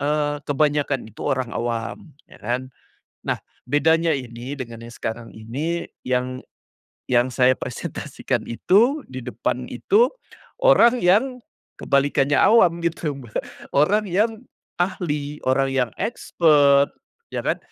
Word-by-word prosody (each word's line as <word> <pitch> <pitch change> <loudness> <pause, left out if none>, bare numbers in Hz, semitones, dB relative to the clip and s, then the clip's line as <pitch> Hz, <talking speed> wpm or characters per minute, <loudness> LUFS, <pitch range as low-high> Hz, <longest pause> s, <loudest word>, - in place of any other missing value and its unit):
eee, 145 +1 0
kebanyakan 145 -2 +1
itu - - -15
orang 130 -4 0
awam, 120 - -4 0.2
ya, - - -15
kan. 125 +4 -3 0.6
Nah - - -1 0.3
bedanya 160 +4 +3
ini 125 -1 -6
dengan 115 -4 -8
yang 120 - -10
sekarang 115 +1 -5
ini 145 +10 -4 0.2
yang 130 0 -1 0.7
yang 120 0 +4
saya 130 0 +4
presentasikan 125 - -4
itu, 235 - +3
di 130 - -5
depan 125 +1 -3
itu 445 +5 +3 0.6
orang 250 - +6
yang 240 +8 +3 0.4
kebalikannya 140 0 +2
awam, 180 -7 +5
gitu 165 -3 -1
Mbak, 120 -5 -5 0.4
orang 205 +9 +3
yang 220 +5 0 0.4
ahli, 150 -5 -2
orang 135 +1 +2
yang 125 -3 +1
expert, 145 -10 +3 0.4
ya, - - -1
kan, - - +1
145 Hz, 120 wpm, -22 LUFS, 125-170 Hz, 0.7 s, orang